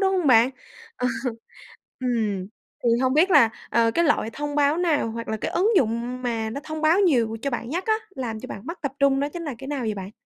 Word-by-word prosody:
đúng 385 Hz, -1 st, +2 dB
hông 360 Hz, -4 st, 0 dB
bạn? 245 Hz, -1 st, +6 dB, 0.5 s
Ờ. 250 Hz, -, -1 dB, 0.9 s
Ừm, 220 Hz, -7 st, -1 dB, 0.4 s
thì 240 Hz, -, +4 dB
hông 260 Hz, +1 st, +2 dB
biết 345 Hz, +6 st, +4 dB
là, 230 Hz, -10 st, +6 dB, 0.2 s
ờ, 230 Hz, -1 st, +3 dB
cái 340 Hz, +8 st, +1 dB
loại 290 Hz, -7 st, +1 dB
thông 290 Hz, +2 st, -4 dB
báo 290 Hz, +1 st, +3 dB
nào 325 Hz, -9 st, +1 dB
hoặc 230 Hz, +1 st, -6 dB
là 220 Hz, -, -1 dB
cái -, -, -4 dB
ứng 390 Hz, +5 st, +2 dB
dụng 240 Hz, -1 st, 0 dB
mà 225 Hz, -3 st, -2 dB
nó 280 Hz, +6 st, -5 dB
thông 310 Hz, 0 st, -5 dB
báo 320 Hz, +5 st, +4 dB
nhiều 240 Hz, -, +2 dB
cho 280 Hz, -, -1 dB
bạn 240 Hz, -2 st, -4 dB
nhất 355 Hz, +5 st, -2 dB
á, 435 Hz, -, +4 dB, 0.2 s
làm 225 Hz, -4 st, -4 dB
cho -, -, -8 dB
bạn 205 Hz, +5 st, -8 dB
mất 335 Hz, +2 st, -6 dB
tập 280 Hz, -2 st, -2 dB
trung 275 Hz, -1 st, +4 dB
đó 285 Hz, -, 0 dB
chính 335 Hz, +3 st, -7 dB
là 290 Hz, -5 st, -4 dB
cái 270 Hz, -, -8 dB
nào 285 Hz, -2 st, -2 dB
vậy 220 Hz, -3 st, -2 dB
bạn? 195 Hz, 0 st, -7 dB
260 Hz, 245 wpm, -24 LUFS, 230-310 Hz, 0.9 s, bạn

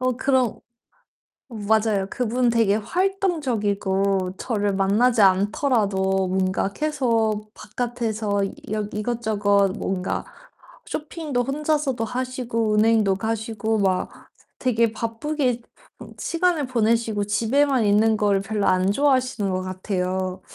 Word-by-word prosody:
어 255 Hz, 0 st, +1 dB
그런 260 Hz, -3 st, +1 dB, 0.9 s
맞아요. 215 Hz, -3 st, +1 dB
그분 245 Hz, +1 st, 0 dB
되게 225 Hz, -3 st, +3 dB
활동적이고 210 Hz, -, 0 dB
저를 205 Hz, -4 st, -1 dB
만나지 215 Hz, +4 st, +3 dB
않더라도 195 Hz, -1 st, +2 dB
뭔가 190 Hz, +1 st, 0 dB
계속 225 Hz, -7 st, 0 dB
바깥에서 220 Hz, -3 st, -2 dB, 0.3 s
여 215 Hz, 0 st, 0 dB
이것저것 210 Hz, -3 st, +1 dB
뭔가 190 Hz, -1 st, -2 dB, 0.6 s
쇼핑도 300 Hz, -4 st, -3 dB
혼자서도 285 Hz, -3 st, -1 dB
하시고 245 Hz, -2 st, -2 dB
은행도 215 Hz, -2 st, +3 dB
가시고 220 Hz, +1 st, -2 dB
막 190 Hz, -2 st, +1 dB, 0.5 s
되게 235 Hz, -3 st, +2 dB
바쁘게 245 Hz, +3 st, -2 dB, 0.6 s
시간을 335 Hz, -4 st, 0 dB
보내시고 230 Hz, -3 st, +1 dB
집에만 240 Hz, +5 st, +2 dB
있는 215 Hz, +2 st, +4 dB
걸 205 Hz, -2 st, +2 dB
별로 205 Hz, 0 st, -2 dB
안 185 Hz, +1 st, +3 dB
좋아하시는 255 Hz, -6 st, +1 dB
것 185 Hz, 0 st, -1 dB
같아요. 185 Hz, 0 st, -3 dB
220 Hz, 250 characters per minute, -23 LUFS, 200-250 Hz, 0.9 s, 있는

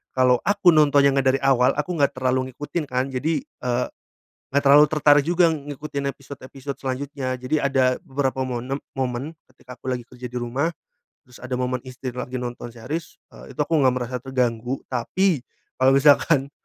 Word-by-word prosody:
kalau 125 Hz, -1 st, +4 dB
aku 200 Hz, -3 st, +5 dB
nontonnya 145 Hz, -3 st, +5 dB
nggak 135 Hz, -1 st, +2 dB
dari -, -, -1 dB
awal 130 Hz, -1 st, +4 dB
aku 150 Hz, +4 st, -2 dB
enggak 140 Hz, -, +2 dB
terlalu 130 Hz, 0 st, 0 dB
ngikutin 145 Hz, +4 st, -4 dB
kan, 130 Hz, +1 st, -1 dB
jadi, 155 Hz, -, -1 dB
eee, 125 Hz, -, -3 dB, 0.7 s
nggak 140 Hz, -, +3 dB
terlalu 145 Hz, +2 st, +7 dB
tertarik 145 Hz, -1 st, +4 dB
juga 175 Hz, 0 st, +4 dB
ngikutin 145 Hz, -1 st, -5 dB
episode-episode 140 Hz, 0 st, -9 dB
selanjutnya. 130 Hz, 0 st, -3 dB
Jadi 130 Hz, +5 st, -1 dB
ada 130 Hz, -2 st, +2 dB
beberapa 135 Hz, -1 st, -2 dB
monem 125 Hz, +2 st, -3 dB, 0.2 s
momen, 130 Hz, +4 st, -3 dB, 0.2 s
ketika 125 Hz, 0 st, -13 dB
aku 130 Hz, -, -5 dB
lagi 125 Hz, -2 st, -4 dB
kerja 125 Hz, -1 st, -9 dB
di 125 Hz, -, -3 dB
rumah, 130 Hz, +7 st, -1 dB, 0.5 s
terus 125 Hz, 0 st, -17 dB
ada 125 Hz, 0 st, -4 dB
momen 125 Hz, 0 st, -1 dB
istri 130 Hz, 0 st, -6 dB
lagi 125 Hz, +1 st, -6 dB
nonton 120 Hz, -1 st, -5 dB
series, 130 Hz, +8 st, -6 dB, 0.2 s
eee, -, -, -13 dB
itu -, -, -20 dB
aku 160 Hz, +1 st, +1 dB
nggak 130 Hz, -3 st, +4 dB
merasa 125 Hz, 0 st, -3 dB
terganggu. 125 Hz, -1 st, -2 dB
Tapi 160 Hz, +7 st, +1 dB, 0.4 s
kalau 130 Hz, +1 st, +5 dB
misalkan 140 Hz, 0 st, +4 dB
130 Hz, 170 wpm, -23 LUFS, 125-145 Hz, 0.7 s, terlalu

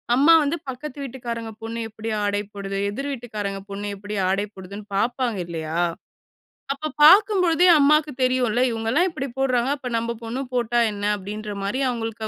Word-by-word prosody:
அம்மா 290 Hz, +6 st, +6 dB
வந்து, 295 Hz, +4 st, -1 dB
பக்கத்து 265 Hz, +2 st, -7 dB
வீட்டுக்காரங்க 235 Hz, -3 st, -5 dB
பொண்ணு 225 Hz, +1 st, -4 dB
எப்டி 220 Hz, +1 st, -6 dB, 0.2 s
ஆடை 205 Hz, 0 st, 0 dB
போடுது? 195 Hz, -1 st, -4 dB
எதிர் 275 Hz, +8 st, -4 dB
வீட்டுக்காரங்க 210 Hz, -6 st, -4 dB
பொண்ணு 200 Hz, +1 st, -5 dB
எப்டி 205 Hz, +1 st, -6 dB
ஆடை 195 Hz, +2 st, +1 dB
போடுதுன்னு 195 Hz, +2 st, -9 dB
பார்ப்பாங்க, 240 Hz, 0 st, 0 dB
இல்லையா? 160 Hz, -1 st, -4 dB, 1.0 s
அப்ப 310 Hz, +3 st, -5 dB
பார்க்கும்பொழுதே 365 Hz, -1 st, +6 dB
அம்மாவுக்கு 300 Hz, +1 st, +4 dB
தெரியும்ல. 250 Hz, -2 st, +2 dB
"இவங்கலாம் 230 Hz, +10 st, +1 dB
இப்டி 275 Hz, -5 st, -4 dB
போடுறாங்க. 255 Hz, -2 st, +1 dB
அப்போ, 270 Hz, -, -7 dB
நம்ம 230 Hz, +1 st, -2 dB
பொண்ணு 235 Hz, +4 st, -3 dB
போட்டா 240 Hz, -1 st, +1 dB
என்ன?" 205 Hz, 0 st, -4 dB
அப்டின்ற 210 Hz, +2 st, -6 dB
மாரி 200 Hz, +7 st, -1 dB
அவங்களுக்கு 225 Hz, -2 st, -4 dB
230 Hz, 150 wpm, -23 LUFS, 205-270 Hz, 1.0 s, அம்மா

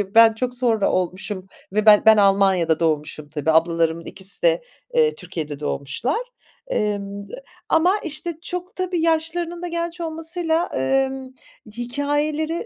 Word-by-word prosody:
ben 230 Hz, -1 st, +8 dB
çok 250 Hz, +2 st, -3 dB
sonra 235 Hz, -4 st, +1 dB
olmuşum 185 Hz, +1 st, -2 dB, 0.3 s
ve 215 Hz, +1 st, +1 dB
ben 210 Hz, -1 st, +7 dB
ben 220 Hz, -1 st, +8 dB
Almanya'da 195 Hz, -5 st, +3 dB
doğmuşum 155 Hz, -2 st, -1 dB
tabii. 155 Hz, +1 st, -1 dB
Ablalarımın 165 Hz, 0 st, +1 dB
ikisi 190 Hz, -, -1 dB
de, -, -, +2 dB, 0.3 s
eee, 470 Hz, -1 st, +3 dB
Türkiye'de 155 Hz, -5 st, -6 dB
doğmuşlar. 150 Hz, -, -2 dB, 0.5 s
Emm, 200 Hz, -, -3 dB
d -, -, -13 dB, 0.4 s
ama 360 Hz, +6 st, +3 dB
işte 335 Hz, +2 st, -3 dB
çok 360 Hz, +1 st, -5 dB
tabii 365 Hz, -2 st, -1 dB
yaşlarının 330 Hz, +1 st, 0 dB
da 355 Hz, -, -4 dB
genç 340 Hz, 0 st, -4 dB
olmasıyla, 325 Hz, +1 st, -1 dB
emm, 265 Hz, -, 0 dB, 0.5 s
hikâyeleri 295 Hz, -, -1 dB
245 Hz, 135 wpm, -22 LUFS, -, 0.5 s, ben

